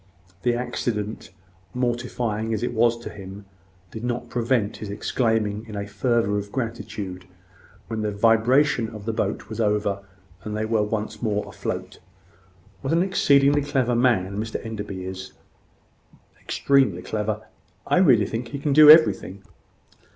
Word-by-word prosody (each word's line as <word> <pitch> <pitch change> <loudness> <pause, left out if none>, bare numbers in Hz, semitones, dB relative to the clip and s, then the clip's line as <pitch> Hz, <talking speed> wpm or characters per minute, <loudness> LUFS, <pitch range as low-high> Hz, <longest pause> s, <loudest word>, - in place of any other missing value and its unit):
The 120 +2 +1
accident, 115 -3 -3 0.5
mortifying 120 -3 -1
as 110 - -4
it 120 - -1
was 115 +1 +3
to - - -6
him, 100 0 -10 0.5
did 110 - -8
not 120 0 -3
prevent 120 -3 0
his 105 - -7
exclaiming 110 0 -1
in 105 - -8
a 100 0 -3
fervour 115 -2 0
of 100 0 -8
gratitude, 105 -6 -5 0.6
when 110 -1 -3
the 105 - -1
vibration 115 +4 +3
of 105 -2 -10
the 115 - -1
boat 110 - -2
was 110 +1 -4
over, 105 -2 +1 0.4
and 105 -1 -4
they 110 - -1
were 110 -1 +1
once 105 +1 -3
more 105 -3 -1
afloat - - -5 0.8
"What 135 - -1
an 170 +2 +3
exceedingly 145 -6 +3
clever 130 -3 0
man 105 -5 +1
Mr 110 +1 -5
Enderby 105 -4 -5
is!" 95 0 -7 1.1
"Extremely 130 -11 +2
clever. 105 0 -3 0.4
I - - +2
really 130 - +5
think 115 +4 -4
he 130 - -6
can 140 0 0
do 150 +1 +9
everything." 100 - +6
110 Hz, 145 wpm, -24 LUFS, 105-125 Hz, 1.1 s, do